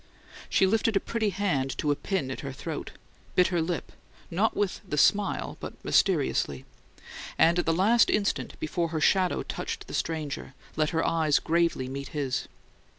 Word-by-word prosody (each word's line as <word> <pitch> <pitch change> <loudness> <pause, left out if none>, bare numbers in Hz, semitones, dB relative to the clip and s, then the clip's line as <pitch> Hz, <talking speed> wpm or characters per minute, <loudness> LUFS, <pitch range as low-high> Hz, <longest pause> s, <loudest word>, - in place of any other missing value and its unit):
She - - +4
lifted 220 +2 +2
a - - +5
pretty 220 -1 -1
hand 145 -11 -1
to 150 - +1
a - - +2
pin 180 -6 -2
at - - -5
her 140 - -5
throat, 130 - -6 0.4
bit 180 -1 +5
her 175 -2 +1
lip 165 +1 -3 0.4
not 200 +6 +1
with 205 -3 -1
the 165 -7 -4
smile, 200 +6 +2
but - - -6
mysteriously 70 -2 +1 0.7
and 170 +2 +4
at 175 - -1
the - - +4
last 205 +8 +4
instant 205 -1 0
before 165 +2 -1
her 160 -1 -3
shadow 185 +4 +2
touched - - -5
the - - -10
stranger, 150 -5 -3 0.2
let 155 -1 +1
her 165 0 0
eyes 155 -3 +3
gravely 165 -5 +1
meet 140 +1 -5
his. 135 -3 -1
165 Hz, 170 wpm, -28 LUFS, 145-195 Hz, 0.7 s, a